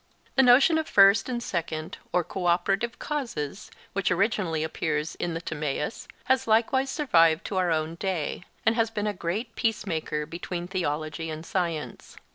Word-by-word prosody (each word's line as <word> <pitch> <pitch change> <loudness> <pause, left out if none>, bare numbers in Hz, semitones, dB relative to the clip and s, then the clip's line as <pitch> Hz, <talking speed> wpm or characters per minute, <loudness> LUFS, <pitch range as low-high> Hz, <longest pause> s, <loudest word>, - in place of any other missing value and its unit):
The 265 - +5
notion 265 +6 +6
of 315 - -3
first 200 +3 +6
and 240 -1 -2
second 160 -4 -4
or 180 - +2
co 180 +2 -3
operative 195 +7 +1
causes, 230 - -4 0.2
which 200 -1 0
originally 180 -4 +1
appears 155 -1 -2
in 170 -1 -3
the 165 - -3
Timaeus, 150 +3 -3 0.2
has 260 -2 +1
likewise 240 +5 +3
survived 165 - +3
to 195 - -3
our 180 -1 +2
own 160 0 0
day, 175 -2 -3 0.2
and 225 - +5
has 225 -1 +1
been 210 -2 -3
a 210 - 0
great 205 +6 -3
peace 225 -2 0
maker 155 -4 -2
between 170 +2 -5
theology 160 -3 -2
and 155 +1 -6
science. 170 -5 -3
180 Hz, 165 wpm, -27 LUFS, 160-225 Hz, 0.2 s, notion